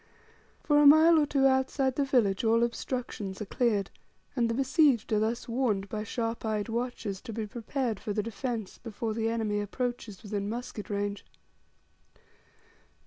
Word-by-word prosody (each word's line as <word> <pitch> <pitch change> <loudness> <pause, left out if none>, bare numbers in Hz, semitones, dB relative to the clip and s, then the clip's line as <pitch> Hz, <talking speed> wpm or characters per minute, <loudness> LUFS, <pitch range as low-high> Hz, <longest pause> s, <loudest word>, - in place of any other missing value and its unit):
For 295 -1 +4
a 295 - +7
mile 315 +3 +7
or 295 - +2
two 275 -1 +2
outside 265 0 +2
the 285 - +1
village 240 -8 +2
all 230 +1 +3
obstructions 235 -5 -3
are 210 - -4
cleared, 210 -1 0 0.4
and 235 -3 +1
the 230 - -1
besieged 270 -3 +3
are 210 - +3
thus 225 +2 -1
warned 230 -5 0
by 210 +1 -3
sharp 230 +1 -3
eyed 215 0 -2
watchers 230 -4 -3
to 235 - -8
be 220 0 -3
prepared 235 0 -3
for 210 - -4
the 210 0 -1
defence 225 -1 -4
before 225 0 -4
the 225 0 -1
enemy 220 -2 -1
approaches 230 -1 -4
within 205 -1 -3
musket 230 -2 -6
range. 205 0 -2
230 Hz, 160 wpm, -29 LUFS, 210-255 Hz, 0.4 s, a